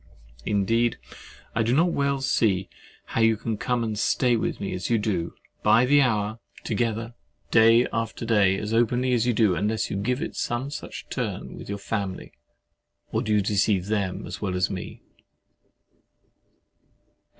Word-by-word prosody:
Indeed 115 +4 +1 0.6
I 115 - +1
do 115 +3 +2
not 170 +4 +3
well 140 -2 0
see 95 -8 +1 0.4
how 115 - -2
you 115 -1 +4
can 110 +1 -3
come 120 +2 -1
and 110 -2 -3
stay 125 +1 +2
with 110 - -2
me 100 - -3
as 90 +1 -4
you 115 - +3
do, 95 -6 -2 0.3
by 120 +3 +5
the 145 +2 +5
hour 110 -3 0 0.2
together, 115 -2 -1
and 115 +1 -17
day 115 +2 +6
after 115 0 -3
day, 100 -4 +3
as 105 +2 -4
openly 120 +2 +2
as 120 0 +2
you 120 - +3
do, 105 -4 +3
unless 110 +5 -1
you - - -2
give 125 +6 -1
it - - -6
some 120 +4 -2
such 145 - -7
turn - - -4
with - - -10
your 100 - -3
family. 100 -2 -4 0.8
Or 110 - 0
do 110 -3 -2
you 105 -1 +4
deceive 100 -1 +1
them 100 -4 -1
as 90 +2 -7
well 95 -3 -2
as 90 +2 +1
me? 95 -2 -7
110 Hz, 170 wpm, -25 LUFS, 100-120 Hz, 0.8 s, day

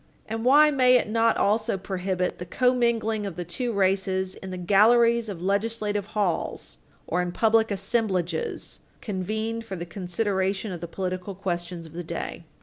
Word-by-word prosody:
And 225 +1 -4
why 295 +4 +6
may 255 -3 +5
it 250 - +3
not 230 +1 +2
also 215 0 +1
prohibit 185 -1 -2
the 180 - -5
commingling 235 -2 +1
of 190 - -6
the 175 0 -5
two 235 +9 -3
races 190 -2 +1
in 190 - -9
the 185 - -5
galleries 225 +5 +4
of 180 -4 -6
legislative 205 0 -1
halls 185 -6 -2 0.3
or 180 +2 0
in 180 0 -2
public 225 +3 +3
assemblages 195 -5 -1 0.2
convened 220 +3 -3
for 195 -4 -6
the 170 -1 -5
consideration 190 +2 -2
of 175 -3 -6
the 170 - -4
political 185 +2 -4
questions 175 -2 -4
of 160 - -13
the 175 +1 -5
day? 170 0 -5
195 Hz, 160 wpm, -26 LUFS, 180-225 Hz, 0.3 s, why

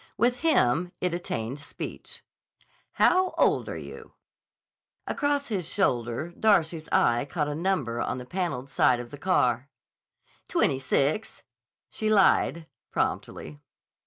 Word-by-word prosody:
With 245 +3 +2
him 180 - +2
it 180 -1 -1
attained 135 -7 -4
speech. 140 - -8 0.7
"How 370 0 +3
old - - +2
are - - -5
you?" - - -10 0.9
Across 285 -1 -1
his 185 -7 -2
shoulder 120 - 0
Darcy's 170 -5 +1
eye 120 0 +3
caught 150 0 -2
a 150 - -2
number 150 -8 -1
on - - -2
the 125 - -7
paneled 150 -5 -3
side 130 -2 +3
of 120 -1 -8
the 145 - -9
car. 135 -7 +1 0.8
"Twenty 130 - +1
six," 140 +9 -1 0.5
she 215 - -2
lied 190 -5 +3 0.2
promptly. 75 -1 -3
160 Hz, 125 wpm, -27 LUFS, 125-195 Hz, 0.9 s, How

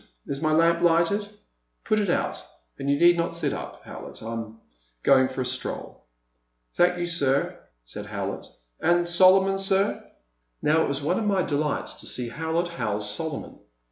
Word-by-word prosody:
Is 140 +1 -4
my 155 -1 +1
lamp 165 +2 +3
lighted? 175 +5 +2 0.5
Put 215 -1 +1
it 205 -3 0
out - - +1 0.3
— - - -39
^and 140 - -2
you 140 - +3
need 175 0 +6
not 170 0 -1
sit 170 - 0
up, - - -7
Howlett; - - -9
I 115 - -5
'm 115 -1 -6 0.5
going 130 -1 +5
for 130 0 -4
a - - -1
stroll." 125 +1 -4 0.7
Thank 180 0 +3
you 175 - -1
sir," 145 -5 0 0.3
said - - -7
Howlett,— - - -4 0.3
and 175 0 +2
Solo 185 +2 +6
mon, 195 0 -1
sir?" 195 +1 0 0.6
Now 155 +2 +3
it - - +1
was 140 0 -2
one 170 +5 +1
of 220 - -2
my 195 -3 +2
delights 150 -1 -1
to - - -5
see 125 -2 -1
Howlett 160 +5 -2
house 105 -10 -2
Solomon. 155 +6 -5
165 Hz, 180 wpm, -25 LUFS, 135-175 Hz, 0.7 s, need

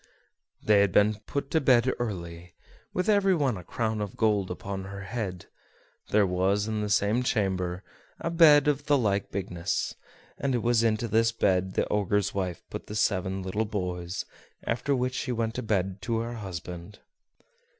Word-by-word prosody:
They 105 -1 +5
had 100 -2 +3
been 105 +3 +3
put 140 0 -3
to 160 - +2
bed 130 -2 +4
early, 90 -6 -5 0.4
with 185 - -1
every 200 -3 +4
one 140 -7 +1
a 90 - -8
crown 110 +3 -2
of 100 -2 -5
gold 105 -4 +2
upon 95 +1 -5
her 100 0 -7
head. 95 -3 -4 0.6
There 105 -1 +4
was 95 +3 +1
in 110 -1 -1
the 105 - -2
same 105 +3 +2
chamber 95 -6 -1 0.4
a 170 - -2
bed 150 -4 +7
of 145 0 0
the 145 -2 +5
like 100 -5 0
bigness, 90 -3 -2 0.5
and 140 -2 0
it 120 - -1
was 120 -1 +3
into 115 0 +1
this 115 +1 +3
bed 95 -4 +1
the - - +1
Ogre's 100 -1 +1
wife 90 -3 -3
put - - -6
the 105 - -6
seven 95 -2 0
little 100 +4 -1
boys, 90 -3 -3 0.4
after 125 +4 0
which 125 0 -1
she 130 - -2
went 115 -2 -1
to 125 - -3
bed 95 -3 -1
to 115 +2 -1
her 115 +1 -4
husband. 90 -1 -7
105 Hz, 175 wpm, -28 LUFS, 95-120 Hz, 0.6 s, bed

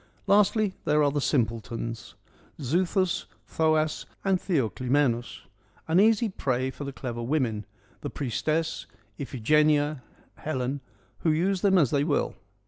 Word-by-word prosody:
Lastly, 205 0 +3
there 150 0 +3
are 145 - +3
the 145 0 -1
simpletons: 115 -3 -2 0.4
Xuthus, 175 +6 0 0.2
Thoas 155 -1 +1 0.2
and 190 -1 +3
Theoclymenus 130 - 0 0.2
— - - -33
an 165 +3 +4
easy 225 +2 +4
prey 130 - -1
for 145 - -7
the 140 - -4
clever 120 -3 -5
women 120 -5 -1 0.2
— - - -32
the - - -4
Priestess, 155 +5 -2 0.3
Iphigenia, 145 +2 +2 0.4
Helen 135 -2 -2 0.4
who 165 - +1
use 180 +4 +1
them 195 -2 +4
as 145 -9 +3
they 140 -1 +2
will. 145 -1 0
145 Hz, 135 wpm, -27 LUFS, 125-170 Hz, 0.4 s, an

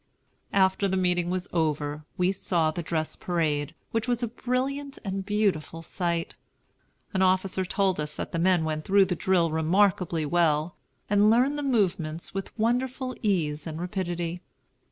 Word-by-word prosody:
After 190 0 +3
the 190 0 0
meeting 180 -1 +1
was 185 +1 -2
over, 150 -2 -1
we 180 +1 +3
saw 170 -4 0
the 175 - -4
dress 160 -1 -2
parade, 155 -3 -1 0.2
which 225 +1 -1
was 245 0 0
a - - +1
brilliant 265 +4 -2
and 195 0 -2
beautiful 195 -6 0
sight. 170 -1 -2 0.8
An 190 - +1
officer 185 0 +2
told 190 -1 0
us 150 0 -3
that - - -5
the 165 - -1
men 180 -1 +3
went 155 -1 -2
through 195 +2 +5
the 180 -1 -1
drill 170 -2 +2
remarkably 170 0 +2
well, 160 0 +2 0.3
and 205 +1 +4
learned 250 +6 +4
the 295 - -2
movements 180 - 0
with 195 +3 -5
wonderful 255 +3 0
ease 160 -8 0
and 160 0 -5
rapidity. 175 -2 -3
180 Hz, 155 wpm, -27 LUFS, 165-205 Hz, 0.8 s, through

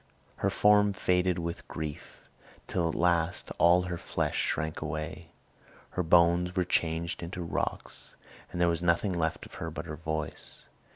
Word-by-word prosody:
Her - - +1
form 105 -1 +4
faded 90 -1 +1
with 85 0 -4
grief, 75 -2 -7 0.4
till 85 -3 0
at - - -3
last 85 0 +1
all 90 +1 +6
her 90 -1 -4
flesh - - -2
shrank 80 +1 -1
away. 80 +2 -4 0.6
Her - - -1
bones 85 +1 +4
were 90 - +3
changed 85 -1 0
into 85 +1 -5
rocks 85 - -4 0.4
and 90 - -5
there 85 - +4
was 85 0 +1
nothing 90 +3 +2
left 80 -2 -1
of - - -14
her - - -2
but - - -6
her 75 - -6
voice. 80 -1 -4
85 Hz, 160 wpm, -30 LUFS, 80-90 Hz, 0.6 s, all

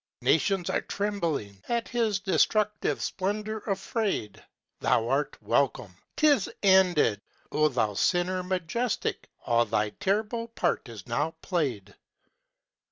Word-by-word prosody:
Nations 190 -3 +2
are - - +1
trembling, 165 - -3
At 235 -1 0
his 225 -4 +1
destructive 210 +2 +1
splendor 210 +3 -2
afraid! 195 - -2 0.4
Thou 115 0 +2
art 145 +2 0
welcome! 125 -8 0 0.2
'Tis 290 -9 +4
ended! 180 - +4 0.3
Oh 155 0 +3
thou 120 -7 0
sinner 180 - +1
majestic, 185 +6 -2 0.2
All 120 0 +3
thy 105 -1 0
terrible 215 - -1
part 230 - -1
is 110 -4 -9
now 145 +7 -1
played! 125 - -2
180 Hz, 110 wpm, -28 LUFS, -, 0.4 s, Tis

